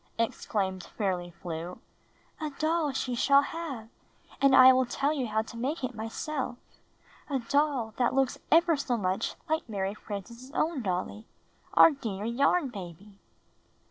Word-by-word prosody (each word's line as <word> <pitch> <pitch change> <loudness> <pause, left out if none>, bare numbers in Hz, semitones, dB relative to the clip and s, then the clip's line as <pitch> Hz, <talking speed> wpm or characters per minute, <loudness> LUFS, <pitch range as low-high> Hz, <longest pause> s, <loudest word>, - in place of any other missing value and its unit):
exclaimed 195 -4 -1 0.2
Fairly 185 -4 -1
Flew, 170 0 -6 0.6
''a 310 - -2
doll 315 -1 +1
she 260 -1 -2
shall 280 +3 +5
have, 280 -8 -5 0.5
and 275 -1 +6
I 260 0 +9
will 255 -1 +2
tell 280 +4 0
you 265 -5 -2
how 220 0 0
to 230 - -11
make 270 +5 -2
it 255 0 -2
myself 245 +4 -4 0.4
— - - -27
a 280 - +1
doll 265 -2 0
that 245 0 +1
looks 270 -2 +1
ever 335 0 +5
so 270 -4 -1
much 185 -2 -1
like 315 -5 -1
Mary 195 -2 -2
Frances' 230 +5 -8
own 315 -4 0
dolly, 200 +2 -3 0.5
our - - +9
dear 215 -8 -5
Yarn 275 +6 +2
Baby!" 195 -1 -10
245 Hz, 150 wpm, -29 LUFS, 205-280 Hz, 0.6 s, I